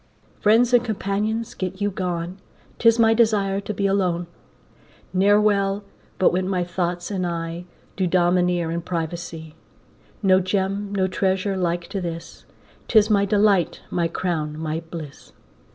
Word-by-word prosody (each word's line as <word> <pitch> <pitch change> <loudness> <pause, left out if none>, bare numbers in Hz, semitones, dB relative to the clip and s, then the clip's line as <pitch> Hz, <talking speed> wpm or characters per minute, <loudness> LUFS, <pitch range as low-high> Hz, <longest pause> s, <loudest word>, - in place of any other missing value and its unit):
Friends 230 +4 +4
and 245 -1 +6
companions 220 +1 -2
get 185 0 -4
you 205 0 0
gone, 180 0 -3 0.4
'Tis 230 -1 +5
my 225 -1 +5
desire 205 -4 +2
to 200 - -5
be 200 -1 -2
alone; 185 -3 +1 0.9
Ne'er 200 +3 +4
well 200 -1 +1 0.3
but 185 - +3
when 185 +1 0
my 180 -2 0
thoughts 175 +1 -3
and 190 -2 -1
I 170 0 -4 0.3
Do 190 -2 0
domineer 175 -1 +2
in 170 +1 -2
privacy. 165 -2 -5 0.7
No 190 -1 +5
Gem, 195 +2 -1
no 195 -2 +1
treasure 190 +1 0
like 175 -2 -1
to 195 - -3
this, 170 -1 -7 0.4
'Tis 215 -1 +4
my 200 -1 +4
delight, 200 -4 +2
my 170 -1 +1
crown, 155 -4 -2
my 160 0 -2
bliss. 155 -5 -9
185 Hz, 145 wpm, -23 LUFS, 175-205 Hz, 0.9 s, and